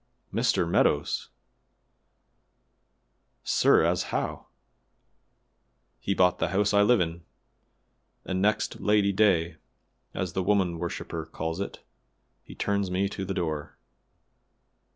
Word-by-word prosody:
"Mr. 85 - +1
Meadows! 85 - +1
La, - - -44 2.1
sir, - - +4
as - - +1
how?" - - -3 1.5
"He 95 +10 -1
bought 90 -1 +3
the - - +1
house 100 +4 +1
I 100 - +5
live 120 +2 +4
in, 85 -1 -2 1.0
and 95 0 -2
next 105 +1 0
Lady 105 -1 +3
day, 90 -5 +2 0.6
as 90 -3 -3
the 95 - 0
woman 95 -3 +1
worshiper 85 0 -5
calls 80 +2 -4
it, 100 - -6 0.6
he - - -12
turns 100 -2 -1
me 95 +2 0
to 95 - -5
the 95 0 -4
door." 80 -4 -3
95 Hz, 115 wpm, -27 LUFS, 85-100 Hz, 2.1 s, I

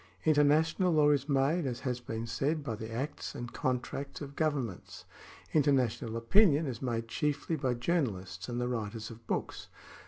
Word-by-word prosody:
Inter 155 -2 +5
national 160 +5 +3
law 150 -1 +5
is 140 0 +1
made, 140 +3 +2
as 120 -2 -3
has 125 -2 -2
been 115 -1 -4
said, 145 +6 -1
by 120 - -3
the 110 +1 -6
acts 140 +6 -4
and 120 0 -6
con 130 -1 0
tracts 140 +2 -6
of 140 -1 -8
governments; 140 - -2 0.5
international 130 -6 +2
opinion 155 - +4
is 125 -5 -4
made 115 -3 -2
chiefly 150 +6 -1
by 130 -4 0
journalists 100 - -1
and 120 0 -2
the 125 - 0
writers 115 -1 -3
of 115 0 -13
books. - - -3
130 Hz, 175 wpm, -31 LUFS, 115-150 Hz, 0.5 s, Inter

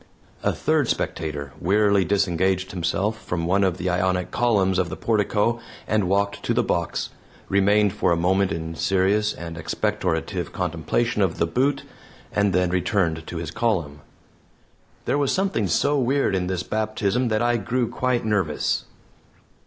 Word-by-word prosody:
A - - +1
third - - +1
spectator 75 -3 -3
wearily 100 +1 +3
disengaged 95 0 +1
himself 95 +5 -1
from 85 -2 -2
one 95 +3 +2
of 95 -2 +1
the 90 0 -3
Ionic 90 0 0
columns 100 -6 +2
of 90 -2 0
the - - -6
portico 110 +1 +1 0.3
and 105 -4 +1
walked 100 +1 0
to - - -1
the - - +3
box, - - -2 0.4
remained 100 +1 +3
for 105 - +1
a - - +4
moment 95 +3 +2
in 80 0 -4
serious 95 +5 +1
and 85 -1 -7
expectorative 80 0 -2
contemplation 90 +7 -1
of 95 -4 +1
the 85 - +2
boot, 130 +11 0 0.5
and 105 -1 +2
then 90 -1 +1
returned 90 -3 0
to 85 - -5
his 80 -3 -4
column. 85 -11 -1 1.0
There 145 - +1
was 140 -2 +1
something 190 - 0
so 145 - +2
weird 135 -3 +1
in 90 -1 0
this 90 -1 -2
baptism 110 +2 -1
that 110 0 +1
I 120 0 +2
grew 120 +3 -1
quite 125 0 -1
nervous. 95 -9 0
95 Hz, 155 wpm, -23 LUFS, 90-110 Hz, 1.0 s, a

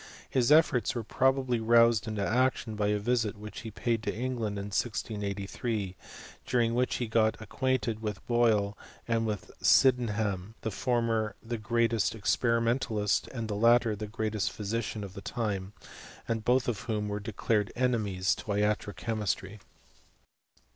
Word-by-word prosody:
His 130 +1 +2
efforts 150 -9 +4
were 120 - -2
probably 130 +1 +1
roused 115 -1 +4
into 105 -2 -1
action 125 -1 +1
by 105 -1 0
a 105 0 +2
visit 110 -1 0
which 105 +1 -8
he 115 - -7
paid 115 +1 -1
to - - -2
England 115 -4 -3
in 100 +1 -4
1683, 105 -1 -2 0.5
during 115 -2 +1
which 125 +1 +1
he 120 - -1
got 110 -1 +2
ac 110 - -8
quainted 120 -4 -1
with 105 -3 -4
Boyle 110 -4 +2 0.3
and 115 -1 +1
with 105 -3 -4
Sydenham; 110 -6 +3
the 110 - -2
former 115 -2 0
the 115 0 -4
greatest 115 -1 +1
experimentalist, 115 +1 +1
and 115 -4 -5
the 105 - -3
latter 115 +1 +4
the 105 +1 -5
greatest 110 -1 -2
physician 105 0 -3
of 95 -2 -8
the 100 - -8
time; 100 -4 -3 0.5
and 115 -1 -1
both 125 +2 +2
of 115 -5 -1
whom 105 -1 -1
were 105 0 -2
de 110 +2 -6
clared 105 0 0
enemies 110 -7 +1
to - - -8
iatro 105 0 0
chemistry. 105 -2 -3
110 Hz, 155 wpm, -29 LUFS, 105-120 Hz, 0.5 s, efforts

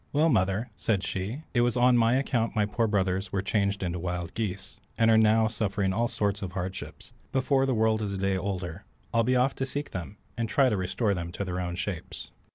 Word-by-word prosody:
"Well, 155 +3 +3
mother," 105 0 +1
said 100 -4 0
she, 100 +11 -3
"it 120 - +3
was 120 0 +1
on 125 0 +5
my 115 +1 +4
account 125 -4 0
my 105 -1 +3
poor 110 +2 0
brothers 95 -2 0
were 95 -1 -1
changed 100 -2 0
into 90 -1 -2
wild 90 -1 -3
geese, 95 -3 -4 0.2
and 115 0 +4
are - - +6
now 110 0 +5
suffering 100 -3 0
all 115 +4 +1
sorts 105 -4 -1
of 95 -3 -5
hardship; 95 0 -5 0.3
before 135 0 +2
the 130 - +1
world 110 0 +2
is 100 -2 -2
a - - -3
day 95 0 +1
older, 95 -1 -4 0.3
I'll 115 - +4
be 130 +3 +2
off 125 +2 +3
to - - -1
seek 145 +2 -4
them, 95 +3 -6 0.2
and 115 -2 -2
try 135 +2 +4
to 105 - +1
restore 100 +3 0
them 85 -2 -4
to 100 - -3
their 90 0 -3
own 90 -1 -3
shapes." 90 -1 -5
105 Hz, 225 wpm, -28 LUFS, 95-115 Hz, 0.3 s, are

